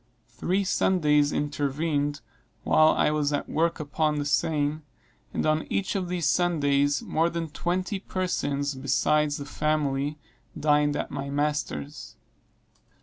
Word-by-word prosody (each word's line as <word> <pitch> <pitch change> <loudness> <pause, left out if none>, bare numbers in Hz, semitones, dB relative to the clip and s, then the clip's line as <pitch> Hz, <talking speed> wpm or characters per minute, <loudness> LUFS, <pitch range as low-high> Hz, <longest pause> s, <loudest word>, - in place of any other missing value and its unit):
Three 185 +11 -1
Sundays 150 -6 +2
intervened 145 0 -1 0.4
while 155 - +5
I 155 - +3
was 150 -1 0
at 145 - -2
work 165 +2 0
upon 150 +1 0
the 145 - -2
seine, 150 0 +1 0.5
and - - -2
on 155 0 +1
each 195 -1 -1
of 185 -3 -2
these 175 -3 -1
Sundays 145 -4 +2
more 165 +2 +1
than 165 -2 -4
twenty 185 +5 -2
persons, 145 -7 -2
besides 145 +3 +1
the 140 - -6
family, 145 -1 -1 0.4
dined 150 -1 +3
at - - -3
my 140 0 -4
master's. 145 - -3
150 Hz, 130 wpm, -26 LUFS, 145-165 Hz, 0.5 s, while